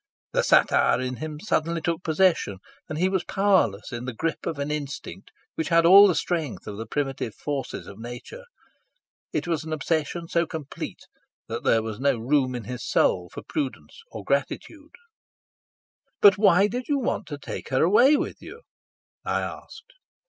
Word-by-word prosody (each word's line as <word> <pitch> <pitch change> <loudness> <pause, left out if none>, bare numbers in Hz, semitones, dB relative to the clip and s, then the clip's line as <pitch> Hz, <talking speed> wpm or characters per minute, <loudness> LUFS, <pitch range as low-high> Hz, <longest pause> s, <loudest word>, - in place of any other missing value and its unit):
The - - +3
satyr 120 - +4
in 130 0 -3
him 155 -1 -6
suddenly 170 -3 0
took 165 0 -2
possession, 165 - +2 0.3
and 155 - -4
he 180 +3 +2
was 190 -2 0
powerless 190 - +1
in 120 +1 -5
the 130 -2 -5
grip 165 +6 -3
of 165 - -3
an 140 +1 -3
instinct 150 -1 -6 0.2
which 160 - -3
had 170 0 +4
all 200 +4 +9
the 180 - +1
strength 160 -6 -2
of 105 -1 -7
the 115 0 -6
primitive 135 -4 -3
forces 140 -4 -4
of 100 - -11
nature. 120 - -9 0.9
It - - -2
was 165 -2 -1
an 160 - -7
obsession 160 +2 -2
so 170 0 +1
complete 150 -4 -7 0.5
that - - -5
there 115 -1 +3
was 110 -1 -5
no 140 -2 +2
room 130 +2 +1
in 120 - -5
his 125 +3 -6
soul 90 -1 +1
for - - -8
prudence 150 - -4
or - - -8
gratitude. 310 -1 -3 1.2
"But 200 -2 +8
why 200 -1 +5
did 245 +4 -3
you 290 - +1
want 255 - -2
to 145 - -6
take - - -7
her 130 +2 +2
away 245 - +5
with - - -3
you?" 470 +1 -11 0.6
I - - 0
asked. 465 +3 -9
155 Hz, 175 wpm, -25 LUFS, 130-185 Hz, 1.2 s, all